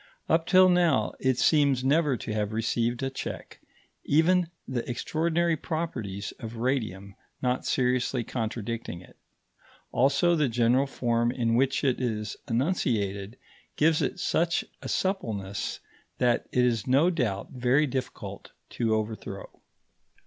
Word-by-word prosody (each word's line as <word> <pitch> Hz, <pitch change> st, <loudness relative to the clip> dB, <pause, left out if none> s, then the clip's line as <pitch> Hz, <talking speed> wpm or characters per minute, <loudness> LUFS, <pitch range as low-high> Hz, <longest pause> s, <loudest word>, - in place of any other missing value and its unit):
Up 165 Hz, 0 st, +2 dB
till 185 Hz, 0 st, +7 dB
now 175 Hz, -6 st, +3 dB
it 130 Hz, -2 st, +1 dB
seems 140 Hz, -4 st, +3 dB
never 145 Hz, -1 st, +2 dB
to 110 Hz, -, -5 dB
have 105 Hz, 0 st, -1 dB
received 120 Hz, +3 st, 0 dB
a 135 Hz, -, -1 dB
check, 130 Hz, -, -7 dB, 0.4 s
even 170 Hz, +4 st, +3 dB, 0.2 s
the 125 Hz, -3 st, -2 dB
extraordinary 165 Hz, +6 st, 0 dB
properties 125 Hz, -, -4 dB
of 115 Hz, 0 st, -7 dB
radium 110 Hz, -6 st, -2 dB, 0.3 s
not 125 Hz, 0 st, 0 dB
seriously 125 Hz, 0 st, +1 dB
contradicting 115 Hz, -5 st, -4 dB
it; 90 Hz, -, -17 dB, 0.8 s
also 140 Hz, +7 st, +3 dB
the 150 Hz, -4 st, +2 dB
general 120 Hz, +4 st, +2 dB
form 120 Hz, -2 st, 0 dB
in 115 Hz, -2 st, 0 dB
which 135 Hz, +3 st, +2 dB
it 130 Hz, -2 st, +1 dB
is 105 Hz, -4 st, -2 dB
enunciated 115 Hz, -, -1 dB, 0.4 s
gives 155 Hz, 0 st, +3 dB
it -, -, -2 dB
such 170 Hz, -1 st, +1 dB, 0.2 s
a -, -, -6 dB
suppleness 105 Hz, -, -2 dB, 0.4 s
that 125 Hz, -2 st, +1 dB
it 125 Hz, -1 st, +3 dB
is 115 Hz, -2 st, 0 dB
no 140 Hz, +8 st, +4 dB
doubt 110 Hz, -, -2 dB
very 130 Hz, +4 st, +2 dB
difficult 130 Hz, -2 st, -5 dB, 0.2 s
to 115 Hz, -2 st, +1 dB
overthrow. 110 Hz, -1 st, -5 dB
125 Hz, 130 wpm, -27 LUFS, 115-150 Hz, 0.8 s, till